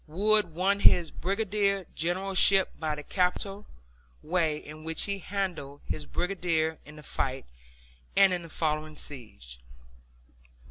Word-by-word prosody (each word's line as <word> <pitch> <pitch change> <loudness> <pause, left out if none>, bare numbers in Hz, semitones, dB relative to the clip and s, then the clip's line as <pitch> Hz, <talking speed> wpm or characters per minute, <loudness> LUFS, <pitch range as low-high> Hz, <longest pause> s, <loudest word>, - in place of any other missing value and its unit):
Wood 205 +1 +2
won 195 +3 +2
his 175 -4 +5
brigadier 200 0 0
generalship 190 +3 +3
by 155 -2 -1
the 150 - -8
capital 195 +3 -1 0.6
way 160 -2 +1
in 155 +1 -10
which 160 0 0
he 200 -1 -2
handled 180 -8 -4
his 80 -3 -4
brigade 165 - 0
in 150 - -13
the 150 - -12
fight, 135 -1 -3 0.7
and 195 -2 +7
in 175 - -1
the 165 - -10
following 155 -1 -2
siege. 105 - -7
170 Hz, 130 wpm, -28 LUFS, 150-195 Hz, 0.7 s, and